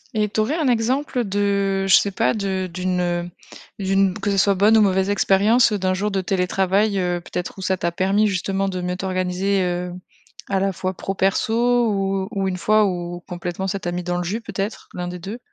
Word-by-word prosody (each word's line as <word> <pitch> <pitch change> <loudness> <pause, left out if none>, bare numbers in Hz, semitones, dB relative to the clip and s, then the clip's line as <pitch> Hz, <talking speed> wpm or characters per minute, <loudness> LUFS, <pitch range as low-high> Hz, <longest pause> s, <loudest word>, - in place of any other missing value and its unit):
Et 210 -1 +2
tu 210 - -3
aurais 220 +8 +1
un 310 -4 0
exemple 250 +2 +1
de, 200 -1 0
je 190 - +7
sais 200 - +4
pas, 225 +4 +1
de 190 -3 -2
d'une, 180 0 -1
heu, 175 0 -1 0.5
d'une 195 -1 +2
b - - -7
que 205 0 -1
ce 195 - 0
soit 200 +1 +4
bonne 205 +4 +4
ou - - +6
mauvaise 190 -1 +2
expérience, 210 +4 +4
heu, 210 - 0
d'un 185 -1 0
jour 200 +3 -1
de 195 -2 -1
télétravail, 195 +2 +1
heu, 180 -2 -1
peut-être 180 +2 -5
où - - -6
ça 190 0 0
t'a 170 0 -1
permis 195 +4 +2
justement 195 0 -1
de 185 -1 -4
mieux 180 0 -2
t'organiser? 185 +1 0
Heu, 180 0 -2 0.6
à 195 - +2
la 195 0 0
fois 185 +1 -3
pro, 195 - -4
perso, 230 +5 +2
ou 195 -1 -1
ou 195 -3 -1
une 185 -1 -2
fois 215 +3 +3
où, 175 -1 -4
complètement, 175 +2 -4
ça 195 +1 -2
t'a 175 - -3
mis 175 +1 -3
dans 175 0 -2
le 180 - -2
jus 200 +7 -3
peut-être, 205 -1 -5
l'1 180 0 -3
des 180 0 -6
2? 200 +7 -7
195 Hz, 225 wpm, -21 LUFS, 180-205 Hz, 0.6 s, je